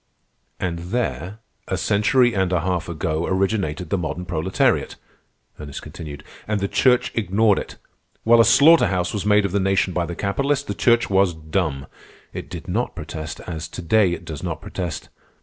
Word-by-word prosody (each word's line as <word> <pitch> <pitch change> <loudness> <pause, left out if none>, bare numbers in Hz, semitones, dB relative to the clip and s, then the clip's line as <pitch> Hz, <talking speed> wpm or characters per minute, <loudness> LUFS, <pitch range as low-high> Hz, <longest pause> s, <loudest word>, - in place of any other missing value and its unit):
"And 85 -2 -2
there, 110 -3 -3 0.3
a - - -1
century 120 +4 +3
and 95 -2 0
a 90 -3 +1
half 90 -1 -2
ago, 80 0 -2
originated 95 -4 -1
the 100 - +1
modern 90 +1 -4
proletariat," 85 +1 0 0.6
Ernest 70 -2 -7
continued. 75 -2 -9 0.2
"And 105 -1 0
the 100 - -1
Church 125 +4 +3
ignored 105 -1 +2
it. - - -8 0.5
While 115 +1 +6
a - - +7
slaughter 150 +9 +6
house 90 -1 -1
was 105 -1 -2
made 105 -1 +4
of 100 - -2
the 100 - +1
nation 95 -1 +1
by 85 -1 -1
the 85 - -5
capitalist, 140 +10 0
the - - -3
Church 120 -1 +3
was 95 -3 +3
dumb. 80 -3 -2 0.5
It - - -7
did - - -8
not - - -2
protest, 80 +1 -6
as 85 -1 -6
to 90 - -8
day 100 +1 +3
it 85 - -7
does 80 -3 -6
not 85 -4 -4
protest. 85 -1 -5
95 Hz, 180 wpm, -22 LUFS, 85-105 Hz, 0.6 s, a